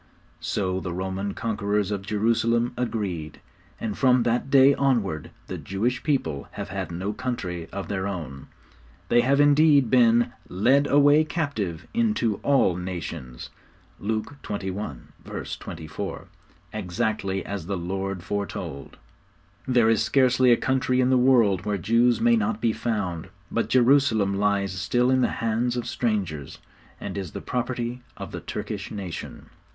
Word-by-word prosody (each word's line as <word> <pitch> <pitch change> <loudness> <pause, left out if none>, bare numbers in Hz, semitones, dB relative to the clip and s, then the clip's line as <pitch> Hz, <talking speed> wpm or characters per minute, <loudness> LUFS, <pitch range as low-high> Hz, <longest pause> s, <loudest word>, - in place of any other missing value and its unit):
So 95 -2 -1
the 90 -2 -5
Roman 95 +2 -3
conquerors 105 -2 -1
of 100 -2 -2
Jerusalem 115 +3 +1
agreed; 95 - -3 0.4
and 110 -3 -3
from 125 -2 +4
that 120 +3 0
day 135 0 +7
onward 115 - 0 0.2
the - - -6
Jewish 115 +6 -1
people 135 - -1
have - - -6
had - - -4
no 95 +5 -3
country 105 -9 -4
of 100 0 -5
their 100 -1 -2
own. 75 -9 -6 0.6
They 120 0 +5
have, 140 +3 +2
indeed, 145 -3 +5
been 120 -1 +4 0.2
'led 130 +10 +3
away 145 +2 +5
captive 140 - -3
into 215 - +1
all 135 -11 +2
nations' 85 -8 -6 0.5
(Luke 110 +6 -3
xxi. 95 - -6
24) 80 -2 -6 0.5
exactly 95 0 -2
as 100 -5 -5
the 100 -1 -2
Lord 95 +1 -3
foretold. 100 -9 -5 0.7
There 125 -3 +4
is 115 -1 +3
scarcely 125 +1 +4
a 120 - +6
country 130 -1 +1
in 130 0 +3
the - - +5
world 120 -7 +4
where 105 -1 -1
Jews 115 +5 +3
may 120 0 +4
not 110 0 0
be 115 -1 +1
found, 95 -8 -3 0.2
but 115 -2 -1
Jerusalem 120 -5 +4
lies 100 -1 +1
still 120 +7 +1
in 130 0 +3
the - - +4 0.2
hands 120 +2 0
of 120 - -2
strangers, 95 - -2 0.4
and - - -6
is 90 -5 -6
the - - -4
property 125 0 -3 0.2
of - - -7
the - - -6
Turkish - - -5
nation. 95 -5 -7
110 Hz, 145 wpm, -25 LUFS, 95-125 Hz, 0.7 s, day